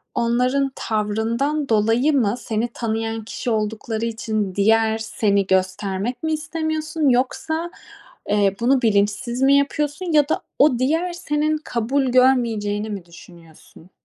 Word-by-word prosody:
onların 250 +4 +1
tavrından 230 +7 -1
dolayı 225 +7 +2
mı 230 -5 +2
seni 225 +1 -2
tanıyan 225 -1 -3
kişi 240 - -5
oldukları 220 +1 -2
için 215 -4 -3
diğer 220 +2 +3
seni 200 -3 0
göstermek 190 - -1
mi 315 0 0
istemiyorsun? 315 -1 -1
Yoksa, 315 +7 -1 0.6
eee, 200 -1 +2
bunu 255 +2 +2
bilinçsiz 215 +3 0
mi 275 +1 +5
yapıyorsun? 295 +4 -1
Ya 295 0 +4
da - - 0 0.2
o 275 -4 +4
diğer 325 +7 0
senin 305 -2 -1
kabul 265 0 -1
görmeyeceğini 230 -5 +2
mi 195 -4 -6
düşünüyorsun? 170 0 -16
235 Hz, 125 wpm, -21 LUFS, 210-280 Hz, 0.6 s, mi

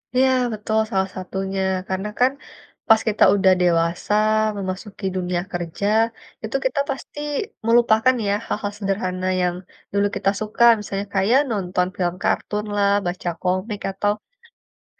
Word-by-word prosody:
Iya 260 +1 +4 0.2
betul, 215 +1 -2
salah 190 0 +1
satunya. 190 +1 -3 0.3
Karena 190 +2 -2
kan, 255 +2 +5 0.6
pas 225 -1 +6
kita 210 - +2
udah 190 -1 +4
dewasa, 170 +2 +1 0.4
memasuki 195 +1 -5
dunia 180 -1 -1
kerja, 175 +3 -3 0.6
itu 220 +5 -4
kita 260 +2 0
pasti 275 +2 -5 0.5
melupakan 235 +1 +4
ya, 200 - +2
hal-hal 205 -1 -2
sederhana 185 -2 -2
yang 175 -1 +1 0.4
dulu 200 0 +2
kita 195 - +2
suka, 215 +2 0 0.2
misalnya 200 -1 -4
kayak 205 +7 +4
nonton 180 -3 0
film 175 -1 0
kartun 210 0 -1
lah, 200 -1 +3 0.2
baca 175 0 -3
komik 185 +3 -1
atau 205 +2 0 0.9
cegat - - -43
195 Hz, 135 wpm, -22 LUFS, 185-215 Hz, 0.9 s, pas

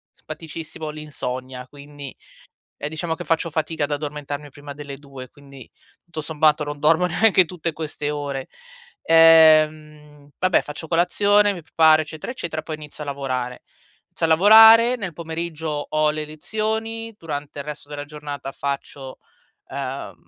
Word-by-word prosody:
simpaticissimo- 155 0 -8
l'insonnia. 130 -4 -6
Quindi, 145 -1 -11 0.6
ehm, 145 - -4
diciamo, 160 +1 -3
che - - -8
faccio 165 0 0
fatica 155 0 -2
ad 145 - -4
addormentarmi 145 0 -5
prima 145 +1 -10
delle 145 -1 -8
2, 135 -3 -11
quindi, 140 -3 -15 0.3
tutto 160 -3 -7
sommato, 150 0 +2
non 145 0 -6
dormo 165 +4 +3
neanche 185 +1 +4
tutte 170 -1 -4
queste 150 -1 -4
ore. 140 -2 -4 0.6
Ehm, 155 -2 +4
vabbè, 185 -1 +3
faccio 150 +2 -7
colazione, 205 +5 +3
mi 175 -4 -8
preparo, 155 0 +4
eccetera, 155 +7 -8
eccetera, 160 -10 -5
poi 160 -1 -6
inizio 150 0 -10
a - - -13
lavorare. 130 -3 -4 0.5
Inizio - - -2
a - - +2
lavorare, 225 +7 +8
nel 195 -7 -5
pomeriggio 160 -2 -4
ho 155 0 +2
le 155 0 -4
lezioni, 220 +7 -4
durante 145 -3 -6
il - - -6
resto 150 -1 -8
della 145 -1 -6
giornata 145 -2 -7
faccio, 140 -1 -5 0.5
ehm, 130 -7 -5
150 Hz, 145 wpm, -22 LUFS, 145-165 Hz, 0.6 s, lavorare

